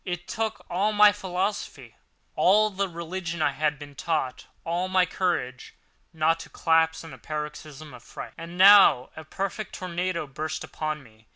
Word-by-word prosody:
It 175 -1 -5
took 220 -1 -3
all 200 +5 0
my 210 0 +7
philosophy, 195 0 -4 0.4
all 215 +3 +4
the 195 0 -2
religion 170 0 -5
I - - +2
had 150 -1 -1
been 145 0 -11
taught, 135 -3 -3 0.2
all 175 +2 -1
my 185 -1 +3
courage, 130 -10 -3 0.4
not 165 0 +1
to - - -10
collapse 160 0 +1
in 165 - -10
a - - -12
paroxysm 150 -1 -7
of 125 - -12
fright. - - -9
And 170 +2 -9
now 190 -9 +7
a 160 - -8
perfect 195 +6 -5
tornado 180 -2 -3
burst 155 +3 -5
upon 155 -2 -4
me. 110 -2 -21
170 Hz, 165 wpm, -26 LUFS, 155-185 Hz, 0.4 s, my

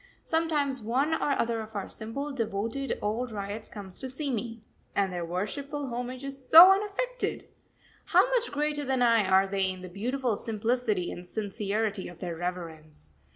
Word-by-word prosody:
Sometimes 300 -5 +1
one 260 +8 +1
or 295 -3 +1
other 230 -1 0
of 220 0 -10
our 200 - -3
simple, 275 +7 -5
devoted, 230 +2 -2
old 230 +4 -1
ryots 205 +1 -5
comes 195 -4 -9
to 260 - -5
see 275 +2 -3
me 230 -1 -4 0.3
and 195 -2 +1
their 175 -1 -3
worshipful 275 - -3
homage 250 +2 -4
is 275 -1 -8
so 345 +4 +11
unaffected! 420 +6 -1 0.6
How - - +5
much - - +1
greater 295 0 -1
than 265 -2 +1
I 230 -4 +4
are 190 +1 +5
they 195 -1 0
in 185 0 -6
the 185 - -7
beautiful 240 +4 -1
simplicity 225 -3 -1
and 175 0 -8
sincerity 205 0 -2
of 175 - -10
their 175 -2 -4
reverence. 160 - -6
225 Hz, 165 wpm, -28 LUFS, 195-275 Hz, 0.6 s, so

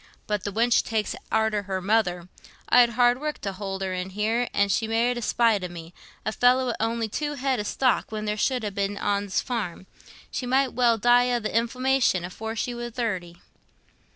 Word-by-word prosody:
"But 210 -2 -2
the 205 - -2
wench 230 +3 +3
takes 220 -2 -2 0.2
arter 220 -1 +1
her 190 -1 -3
mother. 185 -3 0 0.4
I'd 245 -1 +6
hard 245 +1 +4
work 300 0 -3
t' 195 - -3
hould 195 0 -5
her 190 -1 -2
in, 185 +1 -3
an' 210 0 0
she 220 +3 +1
married 235 +2 +1
i' - - -3
spite 225 -3 +2
o' - - -2
me—a 175 +4 -9
feller 250 +3 +3
wi' 245 - -1
on'y 225 0 0
two 295 +7 -3
head 265 -2 0
o' - - 0
stock 250 +4 0
when 215 -1 -4
there 210 0 -1
should 250 +3 0
ha' 205 -2 -3
been 200 +1 -1
ten - - -6
on's 200 -1 0
farm—she 230 +2 -6
might 265 +1 +2
well 235 -1 +3
die 245 +3 +4
o' 240 - +1
th' 220 - -11
inflammation 235 -4 +1
afore 220 +5 -6
she 245 +2 -2
war 240 0 -5
thirty." 190 -8 -3
220 Hz, 195 wpm, -25 LUFS, 200-245 Hz, 0.4 s, I'd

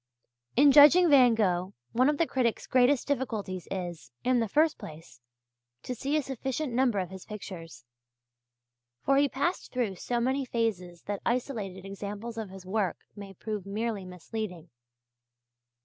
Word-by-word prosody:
In 280 +3 +7
judging 300 +4 +8
Van 250 -4 +7
Gogh, 185 -3 0 0.2
one 255 +4 +3
of 300 - 0
the 335 - +3
critic's 250 -6 -1
greatest 255 +1 +3
difficulties 220 -10 -3
is, 175 -9 -5
in 255 -1 +3
the 225 - 0
first 305 +8 +2
place, 150 -6 -11 0.6
to 250 - -4
see 275 +5 -1
a 300 - 0
sufficient 265 +1 -3
number 245 -3 +2
of 185 -2 -2
his 190 -1 -9
pictures; 165 - -9 1.2
for 275 0 +4
he 285 0 +4
passed 345 +8 -2
through 240 -6 -1
so 240 +6 -2
many 260 +3 0
phases 200 -9 -2
that 205 -1 -4
isolated 220 -7 -2
examples 205 +4 -6
of 215 -3 -5
his 190 -1 -11
work 190 -2 -1 0.2
may 200 -2 -10
prove 210 0 -5
merely 215 0 -2
misleading. 180 -2 -7
220 Hz, 150 wpm, -29 LUFS, 190-260 Hz, 1.2 s, judging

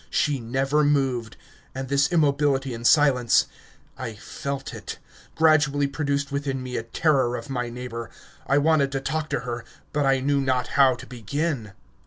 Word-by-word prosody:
She 145 -3 +1
never 135 +5 +1
moved, 135 -6 0 0.4
and 130 0 -4
this 140 +4 +2
immobility 140 -4 +2
and 115 0 0
silence 135 -6 +4 0.5
I 115 -4 -5
felt 135 +5 -6
it - - -7 0.4
gradually 150 -3 +3
produced 140 0 -2
within 140 -2 -2
me 125 -1 -5
a - - -1
terror 125 +1 +1
of 120 +3 -7
my 125 -2 -2
neighbour. 120 -1 -6 0.4
I 140 - +3
wanted 145 -2 +3
to 135 - 0
talk 155 +3 -3
to - - -1
her, 120 -1 -5 0.3
but 145 -2 +1
I 135 0 +3
knew 140 +1 +1
not 130 -2 0
how 135 -2 +4
to - - -11
begin. 125 -1 -3
135 Hz, 165 wpm, -24 LUFS, 125-145 Hz, 0.5 s, silence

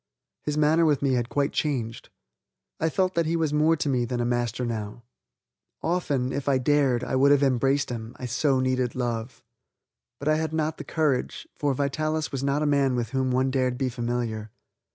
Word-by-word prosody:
His 150 0 -2
manner 155 +2 +4
with 150 -4 +2
me 135 -2 +2
had 120 -1 0
quite 140 0 0
changed. 120 -7 -2 0.7
I 160 - +1
felt 185 +2 +1
that 170 -1 +1
he 165 - +1
was 160 -3 0
more 155 +2 +4
to 150 - -2
me 125 -3 +1
than 120 +1 -2
a 120 - 0
master 120 0 -1
now. 110 0 -5 0.8
Often, 145 -7 0
if 140 0 -2
I 135 - +4
dared, 130 -2 +2
I - - -2
would 135 +2 +5
have 145 0 +5
embraced 135 +1 +2
him, 115 0 -6
I 125 - -6
so 130 +2 +1
needed 130 -1 0
love. 120 -1 -3 0.7
But 145 - -6
I 155 0 +4
had 160 0 -2
not 155 0 -1
the - - -5
courage, 150 -6 -1
for 145 -2 0
Vitalis 155 +3 -1
was 135 -1 -3
not 140 +2 +1
a - - +1
man 140 -3 +2
with 120 -2 -2
whom 130 -1 0
one 130 +1 +1
dared 130 -2 0
be 130 -1 0
familiar. 120 -3 -3
135 Hz, 200 wpm, -26 LUFS, 125-150 Hz, 0.8 s, would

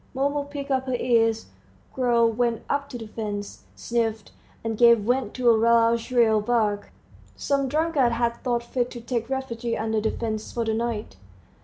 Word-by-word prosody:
Mumu 285 +2 0
pricked 285 -1 -6
up 260 0 0
her 255 - 0
ears, 225 -2 +2 0.5
growled 235 -3 +2
went 235 -1 0
up 280 0 -1
to 245 - -6
the 225 - -8
fence, 210 -2 -6
sniffed, 225 -3 -2 0.3
and 225 -1 -2
gave 235 0 +6
vent 245 0 -1
to 250 -1 -1
a - - +6
loud 230 +1 +4
shrill 230 -3 +2
bark. 210 -2 0 0.4
Some 275 -1 0
drunkard 295 -4 +1
had 235 0 0
thought 240 -2 0
fit 245 0 -2
to 240 - -8
take 235 0 -3
refuge 240 -3 -3
under 220 0 -1
the 220 - +1
fence 220 -2 -4
for 235 -1 -2
the 220 - 0
night. 220 - -3
235 Hz, 175 wpm, -25 LUFS, 225-255 Hz, 0.5 s, gave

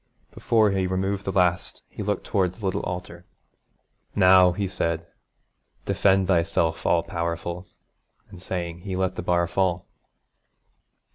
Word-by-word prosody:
Before 110 -3 +2
he 95 -1 0
removed 95 +2 -2
the 95 - -1
last 90 -2 0
he - - -9
looked 105 -1 -2
towards 90 -3 0
the 105 - -7
little 95 - -1
altar. 90 -1 -6 0.9
'Now,' 95 -2 +6
he 100 +2 -2
said, 85 -2 -2 0.8
'defend 95 -1 +2
Thyself, 85 -2 +1
all 85 -1 +3
powerful!' 85 +1 -4 0.6
and 90 - -12
saying, 85 -2 -4
he 95 +1 -5
let 95 0 0
the - - -4
bar 85 -1 +1
fall. 90 0 -1
90 Hz, 135 wpm, -24 LUFS, 85-95 Hz, 0.9 s, Now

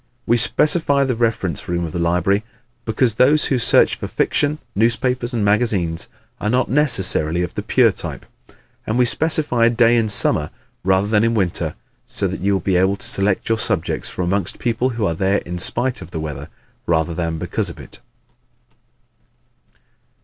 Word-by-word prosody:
We 120 - +3
specify 145 +3 +2
the 130 -2 0
reference 115 - -2
room 85 0 -1
of 80 - -6
the 85 - -4
library 90 +5 +1 0.4
because 115 +1 +1
those 135 +7 +3
who 130 - 0
search - - +4
for - - -5
fiction, 145 +1 0 0.2
newspapers 120 +3 0
and 115 -4 -1
magazines 100 -6 0 0.3
are 105 - -2
not 125 +1 0
necessarily 95 - +2
of 90 - -5
the - - -4
pure - - +3
type. - - -8 0.6
And 110 - -1
we 125 - +4
specify 145 -4 +2
a - - +4
day 120 0 +3
in 115 -2 +1
summer 75 -7 +1 0.3
rather 95 +1 +2
than 105 +1 +2
in 115 0 +1
winter 95 -5 -1 0.3
so - - -1
that - - -6
you 100 +2 +1
will 95 - +1
be 95 +1 +1
able 95 +2 +2
to - - -2
select 100 0 +1
your 115 0 0
subjects 105 -7 -1
from 90 - -4
amongst 95 0 -2
people 120 +2 -1
who 115 -4 -2
are 85 - 0
there 95 +4 +1
in 90 +1 -5
spite 125 +7 +1
of - - -10
the 80 - -5
weather 80 -1 -6 0.4
rather 80 0 0
than 80 -1 -3
because - - -2
of - - -10
it. - - -12
105 Hz, 180 wpm, -19 LUFS, 90-120 Hz, 0.6 s, search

